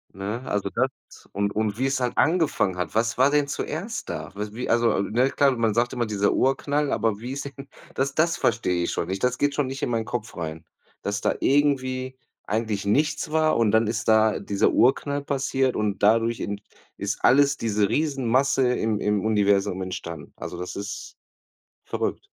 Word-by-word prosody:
Ne, 100 Hz, +5 st, -4 dB
also, 105 Hz, -1 st, -1 dB
das -, -, -4 dB
und 100 Hz, 0 st, -1 dB
und 105 Hz, -1 st, -1 dB
wie's 135 Hz, +1 st, 0 dB
halt 125 Hz, -1 st, -2 dB
angefangen 160 Hz, -, +2 dB
hat. 90 Hz, -1 st, -4 dB
Was 115 Hz, +1 st, +1 dB
war 130 Hz, +2 st, +5 dB
denn 145 Hz, -1 st, +2 dB
zuerst -, -, -4 dB
da? -, -, -5 dB
Was 105 Hz, +1 st, -5 dB
wie 125 Hz, +3 st, -5 dB
also, 115 Hz, -4 st, +3 dB
ne 120 Hz, +6 st, +1 dB
klar, 140 Hz, 0 st, +3 dB
man 115 Hz, -2 st, +1 dB
sagt 120 Hz, +2 st, +1 dB
immer 120 Hz, -2 st, -1 dB
dieser 100 Hz, -2 st, +1 dB
Urknall, 140 Hz, +2 st, +1 dB
aber 105 Hz, -1 st, 0 dB
wie 125 Hz, +4 st, -5 dB
ist 140 Hz, -, -4 dB
denn 140 Hz, 0 st, -9 dB, 0.3 s
das 135 Hz, +1 st, -1 dB
das 165 Hz, +2 st, +2 dB
verstehe 90 Hz, -5 st, +1 dB
ich -, -, -2 dB
schon 85 Hz, -, -2 dB
nicht. 95 Hz, +1 st, -3 dB
Das 125 Hz, 0 st, 0 dB
geht 145 Hz, 0 st, +1 dB
schon 145 Hz, -2 st, 0 dB
nicht 135 Hz, +2 st, -5 dB
in -, -, 0 dB
meinen 115 Hz, -2 st, -1 dB
Kopf 115 Hz, -4 st, -5 dB
rein, 80 Hz, -1 st, -5 dB, 0.4 s
dass 100 Hz, 0 st, -2 dB
da -, -, 0 dB
irgendwie 130 Hz, -2 st, +1 dB, 0.3 s
eigentlich 110 Hz, -2 st, -2 dB
nichts 150 Hz, +9 st, +1 dB
war. 155 Hz, 0 st, +3 dB
Und 115 Hz, -3 st, +3 dB
dann 110 Hz, 0 st, +3 dB
ist 115 Hz, +2 st, -2 dB
da 110 Hz, -1 st, +4 dB
dieser 100 Hz, -1 st, +1 dB
Urknall 140 Hz, +3 st, +2 dB
passiert 135 Hz, -2 st, 0 dB
und 105 Hz, -2 st, -1 dB
dadurch 115 Hz, +2 st, +3 dB
in 100 Hz, 0 st, -4 dB, 0.3 s
ist -, -, -3 dB
alles, 140 Hz, +2 st, +5 dB
diese 105 Hz, -3 st, +1 dB
Riesenmasse 135 Hz, -3 st, +2 dB
im 110 Hz, -3 st, -1 dB
im 105 Hz, -1 st, 0 dB
Universum 100 Hz, -3 st, +2 dB
entstanden. 85 Hz, -4 st, -6 dB
Also, 90 Hz, -, -6 dB
das 90 Hz, +1 st, -6 dB
ist 100 Hz, +1 st, -6 dB, 0.7 s
verrückt. -, -, -3 dB
115 Hz, 190 wpm, -25 LUFS, 105-135 Hz, 0.7 s, war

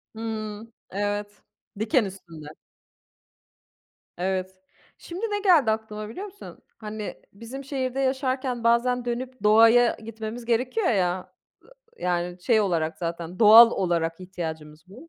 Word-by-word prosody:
Hımm, 220 Hz, 0 st, -6 dB, 0.2 s
evet. 205 Hz, +1 st, -3 dB, 0.4 s
Diken 220 Hz, +2 st, +2 dB
üstünde. 170 Hz, -6 st, -10 dB, 1.7 s
Evet. 185 Hz, +1 st, -3 dB, 0.4 s
Şimdi 360 Hz, +6 st, -6 dB
ne 415 Hz, -2 st, -2 dB
geldi 330 Hz, -, +4 dB
aklıma 215 Hz, -1 st, -4 dB
biliyor 370 Hz, -, -7 dB
musun? 410 Hz, 0 st, -11 dB, 0.2 s
Hani 215 Hz, -1 st, -7 dB
bizim 230 Hz, +6 st, -9 dB
şehirde 265 Hz, -1 st, -3 dB
yaşarken 260 Hz, -2 st, -1 dB
bazen 240 Hz, +1 st, +2 dB
dönüp 250 Hz, -1 st, -5 dB
doğaya 225 Hz, +3 st, +6 dB
gitmemiz 225 Hz, +1 st, -7 dB
gerekiyor 250 Hz, -, 0 dB
ya. 185 Hz, -3 st, 0 dB, 0.7 s
Iıı, -, -, -9 dB
yani 175 Hz, 0 st, -2 dB
şey 220 Hz, +2 st, +3 dB
olarak 170 Hz, -5 st, -1 dB
zaten 170 Hz, +1 st, -5 dB
doğal 230 Hz, +1 st, +9 dB
olarak 170 Hz, -3 st, -1 dB
ihtiyacımız 160 Hz, -4 st, -7 dB
bu. 250 Hz, -, -14 dB
220 Hz, 120 wpm, -25 LUFS, 185-245 Hz, 1.7 s, doğal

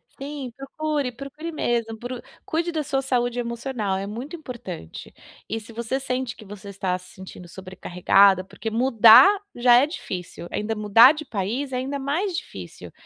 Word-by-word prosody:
Sim, 275 Hz, -2 st, -6 dB
procure, 285 Hz, -1 st, -3 dB
procure 275 Hz, +6 st, -8 dB
mesmo 235 Hz, -7 st, -1 dB
pro 245 Hz, 0 st, -6 dB, 0.2 s
cuide 335 Hz, +2 st, -1 dB
da 315 Hz, -2 st, -1 dB
sua 270 Hz, -2 st, -1 dB
saúde 245 Hz, -2 st, 0 dB
emocional. 235 Hz, -4 st, -3 dB
É 195 Hz, -, -5 dB
muito 245 Hz, +10 st, -6 dB
importante. 235 Hz, -, -9 dB, 0.3 s
E, 225 Hz, -, -3 dB
se 225 Hz, +1 st, -13 dB
você 235 Hz, +4 st, -2 dB
sente 255 Hz, -2 st, -3 dB
que -, -, -13 dB
você 200 Hz, 0 st, -10 dB
está 190 Hz, -2 st, -2 dB
se 180 Hz, 0 st, -16 dB
sentindo 185 Hz, -1 st, -11 dB
sobrecarregada, 185 Hz, +1 st, +2 dB
porque 220 Hz, +3 st, -7 dB
mudar 230 Hz, 0 st, +7 dB, 0.3 s
já 240 Hz, 0 st, +5 dB
é 255 Hz, +4 st, +6 dB
difícil, 180 Hz, -, -7 dB
ainda 215 Hz, +1 st, -2 dB
mudar 215 Hz, +5 st, +7 dB
de 310 Hz, 0 st, -6 dB
país 235 Hz, +5 st, -3 dB
é -, -, -3 dB
ainda 275 Hz, +2 st, -3 dB
mais 335 Hz, +7 st, -1 dB
difícil. 380 Hz, -, -8 dB
240 Hz, 165 wpm, -24 LUFS, 205-275 Hz, 0.3 s, mudar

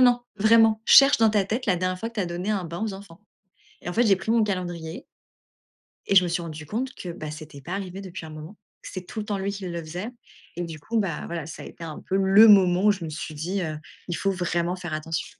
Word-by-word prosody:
non, 245 Hz, -1 st, +5 dB, 0.2 s
vraiment, 220 Hz, +1 st, +5 dB
cherche 275 Hz, +4 st, +8 dB
dans 225 Hz, -1 st, +5 dB
ta 210 Hz, -2 st, +2 dB
tête 225 Hz, +6 st, -3 dB
la 195 Hz, -4 st, +3 dB
dernière 185 Hz, +1 st, -1 dB
fois 225 Hz, +4 st, -4 dB
que -, -, -26 dB
tu 215 Hz, -, -1 dB
as 185 Hz, -, -1 dB
donné 175 Hz, +4 st, -3 dB
un 200 Hz, -4 st, -1 dB
bain 170 Hz, +2 st, -6 dB
aux 220 Hz, -, -2 dB
enfants» 195 Hz, -2 st, -12 dB, 0.6 s
et -, -, -5 dB
en -, -, -4 dB
fait, 235 Hz, -, +3 dB
j'ai 195 Hz, -, +6 dB
pris 205 Hz, +4 st, -3 dB
mon 230 Hz, -1 st, +4 dB
calendrier 175 Hz, -5 st, -4 dB, 1.0 s
et -, -, +1 dB
je 185 Hz, -, +8 dB
me -, -, -1 dB
suis 170 Hz, 0 st, -1 dB
rendue 155 Hz, -2 st, -7 dB
compte 255 Hz, -, -3 dB
que, 180 Hz, -, -7 dB
bah, 155 Hz, -3 st, -6 dB
c'était 155 Hz, -2 st, -10 dB
pas 170 Hz, +7 st, -8 dB
arrivé 195 Hz, -1 st, -5 dB
depuis 185 Hz, -4 st, -8 dB
un -, -, -10 dB
moment. 155 Hz, +6 st, -10 dB, 0.3 s
C'est 185 Hz, -2 st, -7 dB
tout 220 Hz, -, -8 dB
le 210 Hz, -, -6 dB
temps 205 Hz, -1 st, -2 dB
lui 195 Hz, +1 st, -2 dB
qui 195 Hz, -1 st, -6 dB
le 170 Hz, -1 st, -4 dB
faisait 175 Hz, +7 st, -5 dB, 0.5 s
et 175 Hz, -, -2 dB
du 165 Hz, -2 st, -7 dB
coup, 225 Hz, +10 st, -2 dB
bah 180 Hz, -7 st, -3 dB
voilà, 170 Hz, -2 st, -4 dB
ça 160 Hz, -, -9 dB
a -, -, -9 dB
été 170 Hz, -, -10 dB
un 155 Hz, -2 st, -7 dB
peu 190 Hz, -, +1 dB
le 195 Hz, +3 st, +7 dB
moment 190 Hz, -2 st, +6 dB
où -, -, +7 dB
je 190 Hz, -4 st, -7 dB
me 160 Hz, -, -5 dB
suis 155 Hz, 0 st, -6 dB
dit, 175 Hz, +6 st, -3 dB
heu,: 155 Hz, -3 st, -3 dB, 0.3 s
«Il 175 Hz, -, -2 dB
faut 195 Hz, -, 0 dB
vraiment 175 Hz, -1 st, -1 dB
faire 175 Hz, -3 st, -5 dB
attention». 155 Hz, 0 st, -3 dB
185 Hz, 270 wpm, -25 LUFS, 170-205 Hz, 1.0 s, cherche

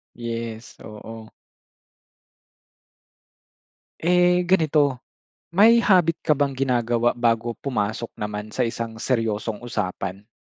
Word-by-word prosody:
Yes, 115 Hz, -1 st, -6 dB
oo. 110 Hz, +1 st, -10 dB, 2.7 s
Eh 180 Hz, +1 st, +3 dB
ganito, 155 Hz, -7 st, +3 dB, 0.6 s
may 230 Hz, +3 st, +7 dB
habit 180 Hz, -7 st, +3 dB
ka 150 Hz, -, +2 dB
bang 140 Hz, -1 st, +1 dB
ginagawa 120 Hz, -3 st, +1 dB
bago 115 Hz, -1 st, 0 dB
pumasok 110 Hz, -3 st, -3 dB
naman 105 Hz, 0 st, -5 dB
sa -, -, -4 dB
isang 115 Hz, -1 st, -2 dB
seryosong 115 Hz, -2 st, -2 dB
usapan? 100 Hz, -3 st, -4 dB
120 Hz, 90 wpm, -23 LUFS, 110-145 Hz, 2.7 s, may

